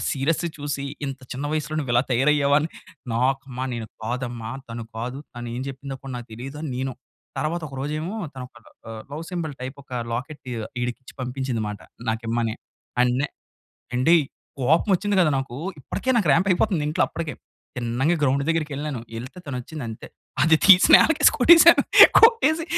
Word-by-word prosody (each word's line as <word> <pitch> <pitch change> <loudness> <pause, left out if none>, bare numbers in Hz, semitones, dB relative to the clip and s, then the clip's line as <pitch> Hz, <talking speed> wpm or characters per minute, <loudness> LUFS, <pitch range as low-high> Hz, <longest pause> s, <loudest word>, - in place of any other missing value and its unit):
Serious 150 +5 0 0.2
చూసి, 145 -1 -3 0.2
"ఇంత 135 -1 -6
చిన్న 140 +3 -4
వయసులో 155 0 -2
నువ్వు 130 -5 -3
ఇలా 120 - +4
తయారయ్యావు" 140 +2 +3
అని. 155 - -2 0.5
నాకమ్మ 130 +1 -1
నేను 115 -2 -5 0.2
కాదమ్మా, 120 -1 -4 0.2
తను 115 -1 -6
కాదు, 125 +3 -4 0.2
తను 120 0 -6
ఏమి 125 +2 -4
చెప్పిందో 135 0 -7 0.2
నాకు 120 -1 -8
తెలియదని 135 +5 -6
నేను. 130 0 -3 0.4
తర్వాత 165 +2 -2
ఒక 135 - -11
రోజు 145 +2 -3
ఏమో, 185 +7 -4 0.2
తను 130 - -7
ఒక 120 - -28 0.3
ఆహ్, 110 -1 -7
లవ్ 160 +3 -5
సింబాల్ 165 -5 -4
టైప్ 130 +2 -6
ఒక - - -40 0.2
లాకెట్ 140 +5 -6 0.4
ఈడికి 120 -1 -3
ఇచ్చి - - -13
పంపించిందినమాట 125 -5 -3 0.3
నాకిమ్మని. 115 0 -2 0.5
అండ్ 125 0 +3
నె 150 - +1 0.7
ఏండి 130 +7 +4 0.5
కోపం 160 - +2
వచ్చింది 205 +2 -1
కదా 155 - +3
నాకు, 135 -2 -4 0.2
ఇప్పటికే 260 - -5
నాకు 205 -7 +1
రాంప్ 175 +6 +2
అయిపోతుంది 185 -1 +1
నాకు 150 - -1
ఇంట్లో 155 - +1
అప్పటికే. 165 -2 -5 0.4
తిన్నంగా 125 +7 0
గ్రౌండ్ 140 0 +2
దగ్గరికెళ్ళాను. 150 -4 -2 0.2
ఏళ్తే 130 +10 -8
తను 135 -3 -4
వచ్చింది 150 +1 -8
అంతే. 110 - -8 0.3
అది 160 +1 +5
తీసి 190 -2 +8
నేలకేసి 305 -2 +5
కొట్టేసాను. 335 +5 +8 0.3
కొట్టేసి 450 -9 +5
135 Hz, 165 wpm, -23 LUFS, 125-160 Hz, 0.7 s, తీసి